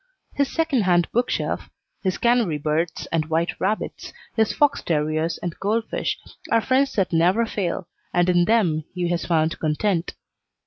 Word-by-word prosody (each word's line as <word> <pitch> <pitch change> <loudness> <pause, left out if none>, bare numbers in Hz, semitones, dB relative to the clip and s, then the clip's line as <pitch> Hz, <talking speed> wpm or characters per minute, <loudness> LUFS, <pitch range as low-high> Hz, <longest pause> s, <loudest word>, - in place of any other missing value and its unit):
His 280 -1 0
second 320 -7 +1
hand 175 -2 +3
bookshelf, 240 +2 -1 0.3
his 185 -2 -1
canary 235 -10 +2
birds 155 +3 -1
and 160 -2 0
white 165 +2 +1
rabbits, 210 +3 -2 0.2
his 220 -2 +2
fox 290 -1 +2
terriers 155 +1 0
and 175 -2 -3
goldfish 220 +3 -1 0.3
are 230 - +4
friends 260 +4 +2
that 190 -4 0
never 180 +8 +3
fail, 190 -5 -3 0.2
and 175 0 +2
in 175 -1 +4
them 180 -9 +2
he 175 -1 -1
has 175 -1 -1
found 160 -1 +1
content. 165 +3 0
180 Hz, 150 wpm, -23 LUFS, 165-225 Hz, 0.3 s, are